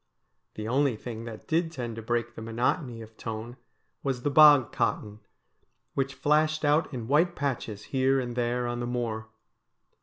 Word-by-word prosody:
The 110 0 -5
only 135 +1 +2
thing 115 0 -7
that 110 -2 -9
did 165 +1 +1
tend 120 -7 -5
to 115 - -6
break 120 +1 -1
the 115 - -9
monotony 115 +2 -1
of 110 0 -15
tone 115 +2 -6 0.4
was 130 -3 -2
the 145 - +1
bog 145 -5 +7
cotton, 105 0 -1 0.7
which 135 0 -1
flashed 155 +1 +2
out 150 +2 +3
in 120 -5 -5
white 165 +6 +3
patches 120 -7 -3
here 135 0 +3
and 120 -2 -4
there 120 0 0
on 120 0 -2
the 120 - -3
moor. 115 -3 -3
120 Hz, 170 wpm, -28 LUFS, 115-140 Hz, 0.7 s, bog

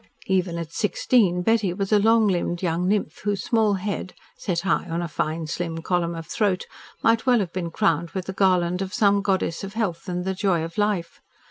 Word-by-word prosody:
Even 185 -3 0
at 165 -1 -5
sixteen 205 -4 +2
Betty 215 -4 +2
was 195 +1 -3
a 210 - +5
long 225 +1 +4
limbed 175 -1 -1
young 175 +1 0
nymph 200 -5 0
whose 205 -1 -1
small 220 -4 +2
head, 190 -1 -4 0.2
set 175 -3 -2
high 190 -1 0
on 165 +1 -1
a 175 - -2
fine 155 +1 -2
slim 165 0 -4
column 170 -1 0
of 165 -1 -6
throat, 200 -2 0 0.4
might 225 +2 +3
well 250 -1 +5
have 190 -6 -2
been 175 -2 -3
crowned 165 0 +1
with 185 0 -4
the 190 - -5
garland 180 -2 +2
of 190 +1 -4
some 200 -3 +3
goddess 190 -4 -1
of 195 +1 -7
health 185 -5 -2
and 180 0 -2
the 190 - 0
joy 185 -4 +1
of 165 +5 -5
life. 205 -5 -1
185 Hz, 210 wpm, -24 LUFS, 170-205 Hz, 0.4 s, a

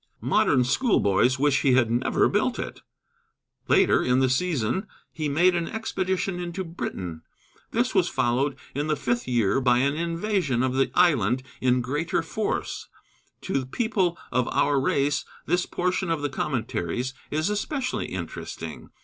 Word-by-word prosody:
Modern 125 - +3
schoolboys 125 - +2
wish 140 0 +2
he 135 - +3
had 120 -3 +3
never 120 +2 +2
built - - 0
it. - - -5 0.9
Later - - +4
in 125 +1 +2
the 130 -1 +3
season 160 - 0 0.3
he 155 -2 -2
made 175 +6 +4
an 170 -1 -1
expedition 190 -4 -2
into 175 +1 -4
Britain. 90 - -5 0.5
This - - 0
was - - +3
followed 130 +4 +1 0.2
in 145 +3 -2
the 155 - +1
fifth 120 -3 -1
year 120 -1 +2
by 125 -2 +4
an 140 +3 +2
invasion 170 - 0
of 130 -1 0
the 135 0 +2
island 130 - +3 0.2
in 125 0 +3
greater 150 +7 -1
force. 210 +5 -3 0.5
To 135 - -1
people 190 - 0
of 125 0 +1
our 145 -1 +2
race 140 +2 +1 0.2
this 175 +2 +1
portion 180 0 -1
of 160 -3 -1
the 145 - 0
Commentaries 125 - -2 0.2
is 155 +6 0
especially 250 +5 -2
interesting. - - -7
145 Hz, 150 wpm, -25 LUFS, 125-175 Hz, 0.9 s, Later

